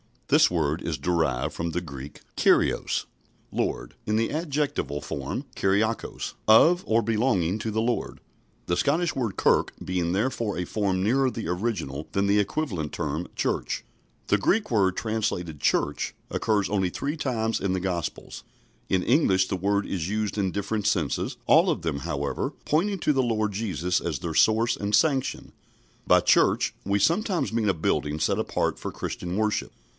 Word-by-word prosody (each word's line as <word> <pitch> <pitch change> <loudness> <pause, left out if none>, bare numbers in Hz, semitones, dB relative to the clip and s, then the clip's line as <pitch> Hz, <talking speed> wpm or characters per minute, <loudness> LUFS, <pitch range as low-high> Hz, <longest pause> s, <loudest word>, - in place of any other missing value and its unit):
This - - +6
word 80 -2 0
is 80 -3 -2
derived 75 -3 0
from 85 0 -3
the 90 - -2
Greek 70 -3 -9 0.2
kurios, - - +2 0.5
Lord, - - -2
in 105 - +1
the 115 +1 +1
adjectival 145 - -2
form 70 -1 -4
kuriakos, 105 +4 0
of 165 +12 +6
or 115 +1 +3
belonging 105 -4 +1
to 110 - -3
the 110 +1 0
Lord 120 +1 -2 0.5
the 85 - 0
Scottish 160 +4 +1
word 115 -7 -2
"kirk" - - +2
being 90 -2 -1
therefore 115 0 -1
a 90 - -1
form 95 -1 -1
nearer 130 +5 +3
the 115 -8 -5
original 90 - -2
than 100 0 +1
the 100 +1 +4
equivalent 100 - -2
term 75 +4 -3
Church. - - -1 0.4
The 105 - +3
Greek 210 - +1
word 95 -5 +3
translated 100 -9 -2
"church" - - 0 0.2
occurs 105 -3 +1
only 95 -3 +1
three 145 - -3
times 115 -6 -1
in 95 -1 -1
the 95 - -1
Gospels. 90 -4 -4 0.4
In 95 -1 +2
English 95 - +3
the 95 - -1
word 100 +2 +1
is 90 -2 -3
used 105 0 -2
in 95 -2 0
different 100 +1 -2
senses, 85 -9 0
all - - +5
of - - 0
them, 80 -4 -2
however, - - -3
pointing 190 +6 +1
to 150 - +2
the 135 - +2
Lord 110 -4 0
Jesus 90 -4 -1
as 80 -5 -3
their 85 -3 -4
source 115 +7 +3
and 105 +1 +1
sanction. 135 -2 +1 0.6
By - - +6
"church," - - +3
we 100 +1 +2
sometimes 175 - +1
mean 110 -2 +1
a - - +3
building 75 -1 0
set - - +1
apart - - -1
for - - -5
Christian 90 +1 -4
worship. 105 0 -1
100 Hz, 165 wpm, -26 LUFS, 85-115 Hz, 0.6 s, This